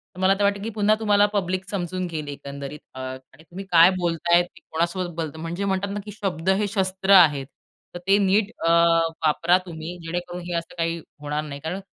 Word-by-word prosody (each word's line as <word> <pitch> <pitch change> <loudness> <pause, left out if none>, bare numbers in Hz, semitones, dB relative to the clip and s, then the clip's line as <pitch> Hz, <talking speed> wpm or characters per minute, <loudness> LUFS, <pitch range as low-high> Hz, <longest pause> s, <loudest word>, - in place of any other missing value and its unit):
तर - - -10
मला 190 +1 +4
तर - - +2
वाटतं 200 0 +1
की 225 - -3
पुन्हा 210 0 +3
तुम्हाला 205 -2 +4
पब्लिक 185 -1 -1
समजून 185 -2 -3
घेईल 155 -3 -5
एकंदरीत. 140 0 -7
अ, 130 - -9
आणि 130 +3 -9
तुम्ही 185 +4 -9
काय 170 +1 +8
बोलताय 170 0 +2
ते 175 - -16
कोणासोबत 175 +2 -1
बोलत, 160 -2 -4
म्हणजे 170 +5 -4
म्हणतात 195 +1 -1
ना, 205 - -3
की 210 - -7
शब्द 190 -4 -3
हे 200 +2 +2
शस्त्र 190 -1 -1
आहेत, 150 -7 +6 0.5
तर 175 - -6
ते 195 +1 +5
नीट 200 +1 +2 0.2
अ, - - +5 0.5
वापरा 165 +3 +3
तुम्ही 165 +1 -7
जेणेकरून 175 +1 -4
हे 175 - -4
असं 170 0 -6
काही 165 0 -1 0.2
होणार 150 +1 -2
नाही, 140 -2 -7
कारण 180 +5 -5
175 Hz, 200 wpm, -24 LUFS, 160-195 Hz, 0.5 s, काय